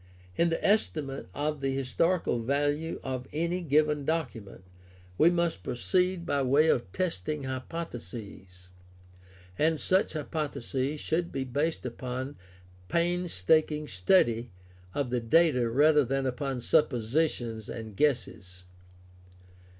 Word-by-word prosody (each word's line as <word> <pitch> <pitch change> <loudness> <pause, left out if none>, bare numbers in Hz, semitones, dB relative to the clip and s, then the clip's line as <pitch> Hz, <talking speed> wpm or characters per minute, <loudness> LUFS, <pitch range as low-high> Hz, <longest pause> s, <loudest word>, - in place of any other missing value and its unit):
In 170 - +3
the 165 - -2
estimate 155 -10 0
of 150 0 -2
the 135 -1 0
historical 135 +2 +1
value 145 +5 0
of 130 -1 -4
any 170 +4 -1
given 150 -2 +2
document 135 - -3 0.5
we 160 - +5
must 170 - 0
proceed 180 - 0
by 140 -4 +1
way 140 +5 +4
of 120 -10 +1
testing 150 - -2
hypotheses, 115 - -7 0.9
and 160 0 +2
such 185 +5 +2
hypotheses 145 -2 -3
should 170 +3 -1
be 135 - -2
based 145 +5 -2
upon 130 +3 -5 0.5
painstaking 160 - +1
study 115 - +2 0.5
of 140 -4 -1
the 125 - +1
data 125 0 +3
rather 150 +4 +5
than 135 +2 -1
upon 130 0 -2
suppositions 120 -4 0
and 110 -3 -7
guesses. 95 -9 -1
140 Hz, 110 wpm, -29 LUFS, 120-160 Hz, 0.9 s, we